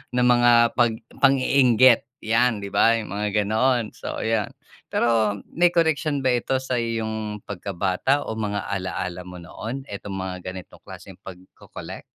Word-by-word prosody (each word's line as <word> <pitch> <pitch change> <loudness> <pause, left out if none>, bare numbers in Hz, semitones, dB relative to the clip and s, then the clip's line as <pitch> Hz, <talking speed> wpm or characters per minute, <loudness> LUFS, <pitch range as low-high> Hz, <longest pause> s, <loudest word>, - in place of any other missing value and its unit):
ng 125 0 +3
mga 120 0 +5 0.2
'pag 120 -2 +2 0.3
pang-iinggit 130 -3 +5 0.2
yan, 115 +1 +2
'di 100 - -7
ba? 115 0 +4
Yung 110 -4 -6
mga 105 +1 -2 0.2
ganon, 115 +2 +1
so - - -6
yan. 110 -2 0 0.4
Pero 110 -3 +1 0.2
may 175 +1 +4
koneksyon 160 -3 +1
ba 130 - +3
ito 125 +2 0
sa 130 -1 -3
iyong 110 -2 -3
pagkabata 100 +7 -1
o - - -3
mga 105 -2 -3
alaala 90 -2 -4
mo 90 0 -10
noon, 115 +9 -7
etong 100 -1 -7
mga 95 -1 -4 0.2
ganitong 95 -2 -11
klaseng - - -11
pagko-collect? 95 0 -11
115 Hz, 150 wpm, -23 LUFS, 100-125 Hz, 0.4 s, mga